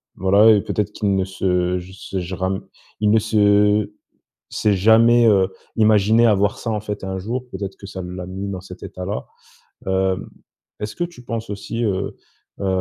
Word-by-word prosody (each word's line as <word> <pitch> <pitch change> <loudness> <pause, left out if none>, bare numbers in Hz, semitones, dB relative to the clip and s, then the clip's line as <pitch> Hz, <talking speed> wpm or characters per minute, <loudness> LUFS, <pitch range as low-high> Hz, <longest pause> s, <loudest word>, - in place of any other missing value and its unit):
voilà 100 +3 +5
et 105 -2 +4
peut-être 105 +1 -2
qu'il 100 -2 0
ne 95 - +1
se 90 -1 0
juse 95 +1 -8
je 90 +1 -5
ram 95 +1 -2 0.3
il 105 -1 +3
ne 110 - +5
se 105 -1 +3 0.6
s'est 105 -2 +1
jamais, 115 +4 +5
heu, 95 -4 +4 0.3
imaginé 110 +1 +4
avoir 105 -2 +2
ça, - - -6
en 105 -1 -1
fait, 105 -2 -5
un 95 0 -3
jour. 120 +6 -4
Peut-être 95 -1 -5
que 100 - -10
ça 95 -1 -7
l'a 90 0 -6
mis 95 +2 -5
dans 95 -2 -5
cet 90 -1 -12
état-là. 90 +3 -5 0.6
Heu, 95 0 +1 0.6
est-ce 105 0 -4
que 175 - -1
tu 170 -7 -10
penses 115 -1 -4
aussi, 105 +3 -4
heu, 100 -3 -2 0.4
hem, 100 - -2
100 Hz, 180 wpm, -21 LUFS, 95-110 Hz, 0.6 s, voilà